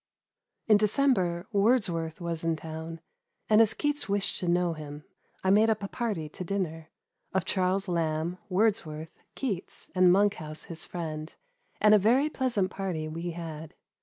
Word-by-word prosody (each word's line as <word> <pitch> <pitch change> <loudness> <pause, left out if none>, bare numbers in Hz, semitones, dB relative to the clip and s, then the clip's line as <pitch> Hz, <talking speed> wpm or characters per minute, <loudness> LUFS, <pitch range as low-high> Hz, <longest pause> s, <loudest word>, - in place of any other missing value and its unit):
In 215 -2 +6
December 205 -6 +2
Wordsworth 195 -7 +2
was 170 -2 -3
in 165 -1 +1
town, 160 +1 -7 0.5
and 215 +1 +6
as 220 -1 +3
Keats 295 -5 -1
wished 200 0 +1
to 180 - -3
know 175 0 +2
him, 150 -1 -8 0.4
I 190 - +3
made 215 +3 +5
up 215 -2 0
a - - -2
party 205 -9 -3
to 180 +5 -7
dinner, 165 -4 -3 0.5
of 190 -1 +1
Charles 190 +1 +1
Lamb, 165 0 -1
Wordsworth, 180 -6 0 0.2
Keats, 205 -9 -4
and 185 -1 +5
Monkhouse, 180 -6 +1
his 165 -2 -5
friend, 155 -3 -5 0.4
and 210 0 +6
a 210 - +7
very 255 +9 +3
pleasant 235 -10 0
party 180 -5 -3
we 165 +3 -4
had. 165 -1 -7
180 Hz, 155 wpm, -28 LUFS, 160-205 Hz, 0.5 s, a